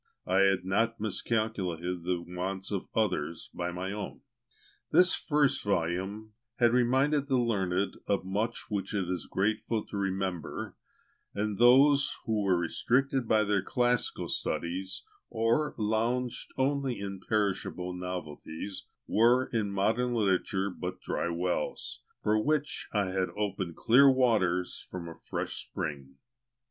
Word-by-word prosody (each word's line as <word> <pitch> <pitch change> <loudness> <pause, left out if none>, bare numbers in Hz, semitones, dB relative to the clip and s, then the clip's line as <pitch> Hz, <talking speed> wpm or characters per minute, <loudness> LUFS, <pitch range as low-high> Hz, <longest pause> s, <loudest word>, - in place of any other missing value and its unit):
I 95 +1 +2
had 95 -2 +3
not 115 +5 +1
miscalculated 95 -5 -1
the 90 -1 -1
wants 95 +2 -4
of 100 -2 -2
others 90 -7 -1
by 90 0 -3
my 90 +2 -4
own. 105 -1 -6 0.7
This 180 0 +6
first 145 -3 +2
volume 100 +3 -1 0.2
had 120 -1 +3
reminded 135 +4 +3
the 135 -2 +2
learned 100 -5 0
of 100 -2 0
much 105 +5 -2
which 100 0 -2
it 95 -3 0
is 90 -1 -3
grateful 110 +2 0
to 100 - -6
remember, 95 -3 -3 0.6
and 105 0 -2
those 135 +4 +6
who 110 -2 0
were 95 -3 +3
restricted 130 +9 +1
by 110 -1 +4
their 100 -2 +1
classical 120 +4 0
studies, 95 +3 -2 0.3
or 115 +7 +1
lounged 115 +3 -1
only 135 -1 0
in 100 -1 -5
perishable 95 -3 -1
novelties, 90 0 -6 0.2
were 120 +4 +4
in 105 -3 0
modern 110 +5 +1
literature 95 -2 +1
but 90 0 -5
dry - - -2
wells, 90 +1 -2 0.2
for 105 +1 +3
which 150 +1 -1
I 100 -3 0
had 95 -1 0
opened 95 -5 -2
clear 135 +4 +6
waters 105 -9 +1
from 90 -2 -6
a 85 - -10
fresh - - -3
spring. 70 -3 -5
100 Hz, 135 wpm, -30 LUFS, 90-120 Hz, 0.7 s, This